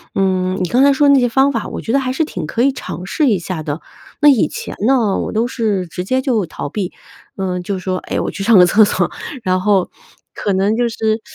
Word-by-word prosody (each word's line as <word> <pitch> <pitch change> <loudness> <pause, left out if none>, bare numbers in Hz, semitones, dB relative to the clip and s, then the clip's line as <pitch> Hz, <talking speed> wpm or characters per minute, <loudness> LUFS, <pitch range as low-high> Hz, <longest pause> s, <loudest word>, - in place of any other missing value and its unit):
嗯， 185 -1 0
你 180 - 0
刚 250 +8 +3
才 280 - +6
说 285 +1 +3
那 280 -1 +6
些 245 -1 +2
方 270 +4 +3
法， 230 -5 -3
我 - - -6
觉 225 - -3
得 275 - +4
还 255 -1 -2
是 310 +5 0
挺 180 - -5
可 225 +9 -2
以 275 - +4
尝 180 - -7
试 295 - 0
一 205 - +2
下 175 -2 -5
的。 150 0 -4 0.4
那 295 - +4
以 265 -6 +4
前 - - -7
呢， 235 -6 +2
我 - - -3
都 225 +2 0
是 215 -7 -1
直 180 +2 -5
接 260 +7 0
就 240 -7 0
逃 160 - -6
避， 185 +4 -4 0.5
嗯， 180 -2 -2
就 195 +2 -3
说： 185 0 -2
“哎， - - -1
我 - - -2
去 195 - -5
上 220 +1 +5
个 180 - +8
厕 210 +5 +5
所。 205 - +1 0.3
“然 185 -1 +1
后， 195 -2 +1 0.4
可 200 - -2
能 195 +3 +1
就 240 0 +1
是 220 -1 -1
210 Hz, 265 characters per minute, -17 LUFS, 185-250 Hz, 0.5 s, 个